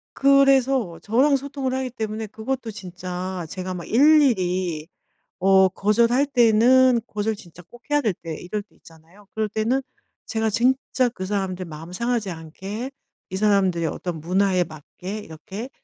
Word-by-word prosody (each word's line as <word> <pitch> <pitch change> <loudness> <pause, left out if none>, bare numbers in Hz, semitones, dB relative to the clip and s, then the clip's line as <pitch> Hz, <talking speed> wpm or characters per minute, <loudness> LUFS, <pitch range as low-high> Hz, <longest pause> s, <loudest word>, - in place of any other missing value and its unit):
그래서 270 -8 +3
저랑 260 +7 +3
소통을 275 -1 -3
하기 260 0 -2
때문에 220 -1 -4
그것도 230 +3 -4
진짜 185 -2 -6
제가 185 0 -5
막 175 -2 -7
일일이 185 - +3 0.5
어 190 0 +5
거절할 235 +8 +2
때는 250 0 +5
거절 210 +1 -2
진짜 180 -4 -14
꼭 240 0 -16
해야 295 0 +3
될 215 -6 +1
때 165 -2 -7
이럴 205 +4 -4
때 210 - -31
있잖아요. 165 +5 -19
그럴 220 -1 -1
때는 225 +6 0 0.4
제가 220 -1 -1
진짜 255 +2 +1
그 185 -5 -6
사람들 190 -2 -2
마음 165 +2 -9
상하지 235 -1 -1
않게 190 - -7 0.4
이 190 - -5
사람들의 190 -5 +2
어떤 170 0 -4
문화에 185 +2 +2
맞게 180 +6 -8
이렇게 195 +7 -8
210 Hz, 305 characters per minute, -23 LUFS, 180-245 Hz, 0.5 s, 어